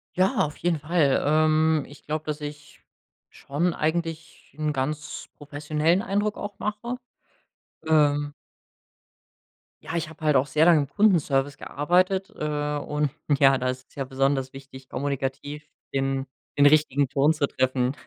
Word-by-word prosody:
Ja, 190 +3 +2
auf 150 - -7
jeden 175 -2 0
Fall. 150 -2 +2
Ähm, 155 0 +3
ich 145 - -15
glaube, 155 +1 -3
dass 150 0 -3
ich 145 0 -9 0.5
schon 165 +5 -1
eigentlich 160 +1 -3
'n 155 0 -1
ganz 145 +2 -4
professionellen 150 +5 0
Eindruck 205 -1 -1
auch 205 -1 -7
mache. 215 +4 -3 0.9
Ähm 145 -2 +3 1.5
Ja, 160 - -6
ich 165 -1 -2
habe 155 0 -14
halt 150 -2 +4
auch 130 +2 +3
sehr 155 +3 +3
lange 170 -3 +6
im 140 - -1
Kundenservice 145 -8 +2
gearbeitet, 185 +8 +1
äh, 150 -1 -2
und 150 0 -1 0.3
ja, 135 -1 +6
da 130 - -2
ist 130 +1 -5
es - - -25
ja 135 -2 -3
besonders 135 0 0
wichtig, 135 -1 -12
kommunikativ 140 +2 -3 0.3
den 135 0 0 0.3
den 145 0 +7
richtigen 145 -2 +3
Ton 145 +2 +3
zu 150 -2 0
treffen. 130 0 0
150 Hz, 145 wpm, -25 LUFS, 140-160 Hz, 1.5 s, den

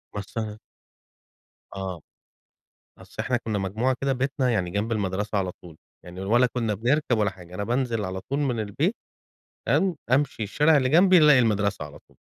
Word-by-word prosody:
مثلًا. 105 +1 -5 1.2
آه، 95 -3 -5 1.0
أصل - - -16
إحنا 125 -1 0
كنا 110 -3 -3
مجموعة 110 +7 0
كده 135 0 +1
بيتنا، 130 0 -1
يعني 95 -6 -1
جنب 105 +4 -2
المدرسة 105 -1 -1
على 95 -2 -1
طول، 85 -3 -15 0.3
يعني 90 +1 -9
ولا 120 +6 +3
كنا 115 -3 -2
بنركب 120 +3 +1
ولا 105 -1 +2
حاجة. 90 -1 -13
أنا 100 - -3
بانزل 120 -2 -1
على 95 0 -5
طول 140 +9 -3
من 130 -5 0
البيت 130 - -1 0.7
تمام، 190 -4 +2
أمشي 130 -3 +1
الشارع 150 +9 +3
اللي 130 -3 +2
جنبي 180 +5 +6
الاقي 150 -3 +6
المدرسة 105 -6 +1
على 75 0 -11
طول. - - -26
110 Hz, 165 wpm, -25 LUFS, 100-130 Hz, 1.2 s, جنبي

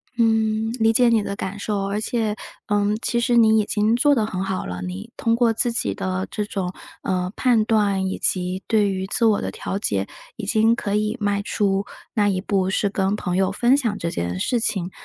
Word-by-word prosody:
嗯， 225 -1 +2
理 225 0 +4
解 245 +1 +4
你 230 -2 +3
的 200 -1 -4
感 200 +1 -5
受， 205 -1 -2
而 205 +2 -2
且， 220 -2 -1 0.3
嗯， 205 0 +1
其 235 - 0
实 240 +1 +1
你 220 -1 +5
已 210 - +1
经 215 +2 +1
做 285 +4 +4
得 225 -4 +1
很 190 -3 -3
好 190 -1 -3
了， 90 0 -5
你 90 +1 -6
通 230 -1 +1
过 235 -1 +3
自 235 +2 +1
己 100 - -1
的 95 0 -3
这 210 - -2
种， 190 -3 -3 0.3
呃， 180 0 -1
判 235 -4 +3
断 200 -4 +1
以 190 - -3
及 185 +1 -1
对 210 -3 +3
于 190 -1 -2
自 230 +4 0
我 215 -2 +3
的 - - -3
调 195 - -4
节， 100 - -1 0.3
已 220 - -6
经 220 +2 +3
可 205 -3 -2
以 210 +3 0
迈 205 -1 0
出 200 -1 0 0.3
那 205 -2 +3
一 185 -2 -1
步， 190 -2 0
是 200 +1 +1
跟 195 0 0
朋 180 -3 -3
友 190 0 +2
分 240 +6 +3
享 230 -7 -1
这 170 - -2
件 90 - -3
事 245 - 0
情， 190 -5 -1
205 Hz, 235 characters per minute, -22 LUFS, 190-225 Hz, 0.3 s, 你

